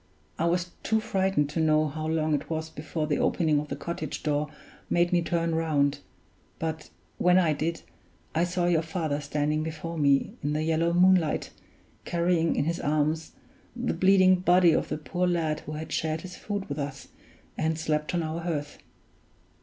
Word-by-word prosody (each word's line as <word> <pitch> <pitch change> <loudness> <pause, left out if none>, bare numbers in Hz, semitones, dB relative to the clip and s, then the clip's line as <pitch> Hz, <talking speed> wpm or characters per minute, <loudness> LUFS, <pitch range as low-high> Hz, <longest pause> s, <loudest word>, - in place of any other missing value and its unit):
I 165 - +2
was 175 +1 0
too 220 0 +1
frightened 190 -8 +1
to 165 - -2
know 155 -1 +3
how 155 +2 -4
long 155 -1 +1
it 145 -1 -2
was 160 0 -3
before 155 +1 -3
the 150 -1 0
opening 155 -4 +2
of 150 - -5
the - - -4
cottage 160 -3 -5
door 150 -1 0 0.4
made 175 +1 +2
me 175 - +4
turn 165 0 0
round; 145 -3 +1 0.6
but 160 -1 -4 0.3
when 180 0 +5
I 170 -4 +4
did, 155 - -3 0.5
I 165 - +2
saw 175 0 -1
your 170 -2 +3
father 160 -3 -2
standing 150 +1 -1
before 160 +1 -5
me 140 -2 +3
in 145 +1 -1
the 155 +1 0
yellow 165 +1 +1
moonlight, 180 -2 +3 0.5
carrying 170 -1 +1
in 140 - +1
his 170 +1 -1
arms 155 +2 0 0.4
the 245 0 -1
bleeding 185 -1 +5
body 180 -1 +5
of - - 0
the - - -2
poor 175 +4 -1
lad 160 -3 0
who 155 - -8
had 155 +1 -6
shared 160 0 -1
his 185 -1 -9
food 205 -2 -4
with 145 +1 -4
us 140 -1 -5 0.5
and 160 0 0
slept 155 +1 -1
on 170 - 0
our 160 +2 -3
hearth. 150 -4 -4
160 Hz, 180 wpm, -27 LUFS, 150-175 Hz, 0.6 s, when